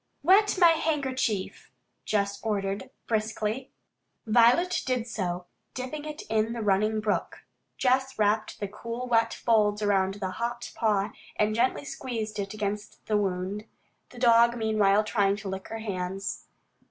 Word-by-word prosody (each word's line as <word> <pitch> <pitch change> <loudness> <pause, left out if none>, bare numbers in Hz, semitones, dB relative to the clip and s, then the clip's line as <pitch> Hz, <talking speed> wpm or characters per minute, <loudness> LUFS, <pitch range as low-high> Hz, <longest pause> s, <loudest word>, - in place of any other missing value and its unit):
"Wet 400 +5 +5
my 345 -2 +8
handkerchief," 265 -10 -1 0.4
Jess 200 -1 0
ordered 200 -2 -2 0.2
briskly. 220 +3 -2 0.6
Violet 240 +11 +4
did 250 -3 0
so, 180 -6 -3 0.3
dipping 275 +4 -5
it 305 0 -6
in 220 +1 +1
the 230 -2 -4
running 215 +2 +2
brook. 210 -1 -2 0.3
Jess 265 +1 +1
wrapped 215 +1 +1
the 205 - -2
cool, 230 +4 -6
wet 230 -2 +2
folds 210 -2 +2
around 195 -2 +2
the 190 -2 -3
hot 235 +5 -4
paw, 210 -2 +1 0.2
and 210 0 +1
gently 250 +5 +1
squeezed 225 -6 -4
it 200 +1 -4
against 210 0 -4
the 215 - 0
wound, 195 +1 -2 0.4
the - - -15
dog 235 0 +5
meanwhile 215 -2 +3
trying 205 -2 +2
to 205 -1 -8
lick 190 0 -5
her 225 - -5
hands. 195 -2 -4
215 Hz, 140 wpm, -27 LUFS, 205-240 Hz, 0.6 s, my